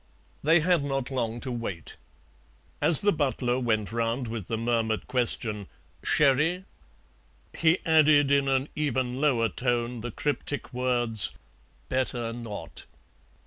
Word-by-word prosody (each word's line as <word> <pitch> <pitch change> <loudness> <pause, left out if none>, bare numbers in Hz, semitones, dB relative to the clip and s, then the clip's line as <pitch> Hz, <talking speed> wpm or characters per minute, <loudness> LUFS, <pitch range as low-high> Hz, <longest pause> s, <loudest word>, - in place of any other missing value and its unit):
They 160 +3 +4
had 175 -2 +2
not 135 -2 -3
long 120 -3 -2
to 130 - -4
wait. 110 -9 -6 0.9
As 160 - +8
the 205 - +3
butler 130 -5 -1
went 110 -5 -1
round 115 +2 -2
with 110 -4 -6
the 115 - -2
murmured 115 -1 -1
question, 115 -5 -1 0.3
"Sherry?" 150 +6 +2 0.9
he 165 +1 +3
added 150 -3 +4
in 140 -1 +3
an 135 +1 0
even 130 -3 -2
lower 125 -7 +2
tone 120 -1 -2
the 120 - -5
cryptic 145 +1 -3
words, 120 -4 +2 0.5
"Better 125 -3 -2
not." 115 -3 -8
125 Hz, 125 wpm, -27 LUFS, 115-145 Hz, 0.9 s, As